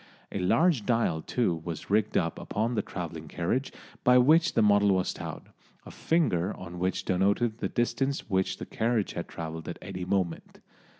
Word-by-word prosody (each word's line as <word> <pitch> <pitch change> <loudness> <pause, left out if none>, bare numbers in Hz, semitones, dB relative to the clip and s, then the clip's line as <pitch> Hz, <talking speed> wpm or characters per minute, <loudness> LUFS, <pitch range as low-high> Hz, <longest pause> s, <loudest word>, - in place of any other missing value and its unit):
A - - -3
large 135 - +3
dial 115 -9 +1
too 90 -9 0
was 85 +2 -6
rigged 105 0 +2
up 85 -2 -1
upon 110 +4 -2
the 110 - +1
travelling 85 -5 -6
carriage 90 - -1 0.3
by 125 0 +6
which 155 +6 +5
the 115 - +4
model 100 -1 +4
was 95 - 0
towed, - - -7 0.4
a - - -9
finger 105 - +1
on 90 -1 -8
which 95 +1 -1
denoted 100 +5 +1
the - - -2
distance 135 +3 -1
which 95 -2 0
the - - -6
carriage 115 -2 0
had 85 - -4
travelled 80 0 -6
at 85 - -5
any 90 -1 -6
moment. 90 -3 -2
100 Hz, 175 wpm, -28 LUFS, 90-120 Hz, 0.4 s, by